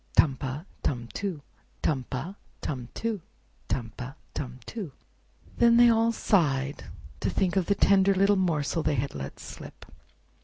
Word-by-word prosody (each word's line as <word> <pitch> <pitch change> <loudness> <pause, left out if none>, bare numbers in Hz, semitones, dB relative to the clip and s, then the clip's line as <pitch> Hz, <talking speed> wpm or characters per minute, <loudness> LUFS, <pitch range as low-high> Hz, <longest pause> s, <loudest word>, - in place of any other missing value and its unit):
Tum 140 -4 +6
pa, 135 +3 -4 0.2
tum 120 -4 -2
too; 185 -8 -3 0.4
Tum 135 -5 +1
pa, 155 +8 -3 0.3
tum 125 -4 -4
too; 225 -4 -2 0.5
Tum 115 -4 -2
pa, 130 +3 -7 0.2
tum 130 -2 -5
too!" 200 - -6 0.7
Then 235 0 +6
they 240 0 +8
all 230 0 +4
sighed 145 -11 +1 0.3
to - - 0
think 185 -1 +1
of 190 -3 +2
the 200 - +3
tender 195 0 +5
little 195 +2 +5
morsel 165 -4 +1
they 155 -1 +1
had 140 +2 -1
let 70 -1 -6
slip. - - -10
155 Hz, 155 wpm, -28 LUFS, 135-200 Hz, 0.7 s, they